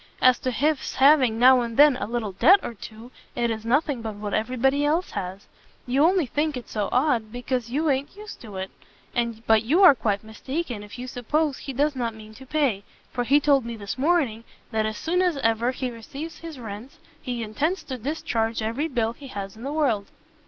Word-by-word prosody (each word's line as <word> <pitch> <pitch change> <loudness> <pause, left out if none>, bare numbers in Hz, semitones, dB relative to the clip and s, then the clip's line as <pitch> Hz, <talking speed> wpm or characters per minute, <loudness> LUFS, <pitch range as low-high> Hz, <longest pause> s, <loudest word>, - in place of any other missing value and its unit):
As 255 -1 +5
to 255 - -2
his 290 +4 0
having 265 -4 +5
now 255 +1 +6
and 230 -1 -4
then 290 -1 +7
a - - -4
little 230 -3 -2
debt 360 - +6
or - - -4
two, 225 +3 -11 0.2
it 235 -1 0
is 220 -1 -4
nothing 265 +2 +1
but 220 -2 -5
what 205 0 -5
every 250 +4 -1
body 270 +4 +2
else 320 +5 +1
has. 185 +2 -5 0.4
You 265 +4 +2
only 355 0 +4
think 295 +3 -1
it 245 - -8
so 210 -2 -2
odd, 250 -5 +1
because 245 0 -3
you 300 +6 0
a'n't 275 +3 0
used 425 +1 -10
to 215 -4 -10
it: 190 0 -5 0.7
but 220 -1 +5
you 305 - +3
are 360 - +10
quite 205 -5 -1
mistaken 245 +3 -5
if 210 +3 -10
you 250 - -6
suppose 265 +4 -1
he 275 - -6
does 285 +3 0
not 235 -3 -2
mean 215 0 -12
to 265 +4 -13
pay, 260 -9 0 0.3
for 245 - -1
he 280 +4 +5
told 280 -2 +3
me 235 0 -5
this 200 -2 -5
morning 270 -6 +1 0.3
that 220 -1 0
as 215 -1 -4
soon 355 +3 0
as 355 -5 +1
ever 230 -1 +1
he 255 -1 -3
receives 275 +8 -8
his 330 -3 -8
rents, 225 +2 -8 0.2
he 245 -3 -3
intends 295 - -1
to 260 - -5
discharge 230 -4 -2
every 235 +8 -1
bill 235 -6 -1
he 275 +3 -12
has 195 -4 -6
in 220 - -13
the 275 +3 -4
world." 250 -10 0
250 Hz, 215 wpm, -25 LUFS, 220-290 Hz, 0.7 s, are